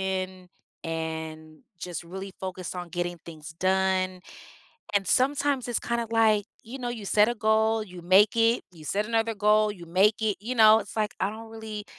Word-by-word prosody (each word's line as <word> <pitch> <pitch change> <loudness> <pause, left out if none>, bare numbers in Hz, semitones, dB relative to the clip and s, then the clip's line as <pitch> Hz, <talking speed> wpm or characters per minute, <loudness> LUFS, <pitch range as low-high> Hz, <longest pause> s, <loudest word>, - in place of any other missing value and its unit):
goal-driven, 185 -1 -3 0.4
and 160 -1 -5 0.2
just 175 -2 -6
really 190 +3 -7
focused 185 -1 -5
on 175 -1 -6
getting 175 0 -3
things 160 -1 -10
done. 185 -1 +1 0.7
And 200 -1 +2
sometimes, 275 +2 +1
it's 240 - 0
kinda, 235 -1 -2
like, 220 -2 +3 0.2
you 245 +5 -9
know, 245 -2 -4
you 230 -4 -6
set 210 +2 +4
a 240 - -1
goal, 220 0 +2
you 180 -3 -11
make 195 +5 +5
it. 230 +1 +3
You 160 -3 -14
set 205 +7 -1
another 225 0 0
goal, 210 +1 +3
you 180 -4 -11
make 190 +6 +3
it. 215 -2 0
You 235 +5 -4
know, 220 -2 +7
it's - - -9
like, 215 -1 -1
I 195 - +1
don't 220 +1 -10
really 220 -2 -7
205 Hz, 185 wpm, -27 LUFS, 180-220 Hz, 0.7 s, know